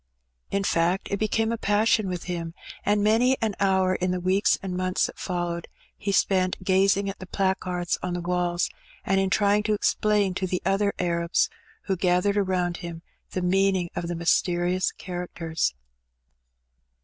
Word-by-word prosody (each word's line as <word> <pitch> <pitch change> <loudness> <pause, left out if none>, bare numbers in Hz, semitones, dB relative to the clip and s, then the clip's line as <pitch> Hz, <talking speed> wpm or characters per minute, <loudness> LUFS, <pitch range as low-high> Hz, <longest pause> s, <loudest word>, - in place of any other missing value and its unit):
In 200 0 0
fact, 175 +1 +1
it 200 - -1
became 220 +1 +1
a 230 - -2
passion 210 -1 +2
with 180 -2 -4
him, 170 -2 -4 0.3
and 205 0 +2
many 240 +5 +4
an 220 -2 0
hour 190 -1 +3
in 185 0 -1
the 180 0 0
weeks 190 +4 +2
and 185 -2 -3
months 185 0 +1
that - - -8
followed 175 -2 -3 0.3
he 200 - -3
spent 185 -1 +1
gazing 195 +1 +3
at 195 - -5
the 185 - -8
placards 185 -2 -1
on 180 -1 -2
the 175 - -3
walls, 175 0 0 0.4
and 195 0 +2
in 195 0 +1
trying 205 +1 +3
to 215 0 0
explain 205 -1 +1
to 185 0 -2
the 180 0 -1
other 195 +2 +2
Arabs 170 -1 +1 0.3
who 190 - -1
gathered 180 +3 +2
around 185 -3 0
him 170 -2 -7 0.3
the 185 - -2
meaning 190 -1 +2
of 175 0 -3
the 175 - -3
mysterious 175 +2 +1
characters. 170 - -3
185 Hz, 165 wpm, -25 LUFS, 175-200 Hz, 0.4 s, many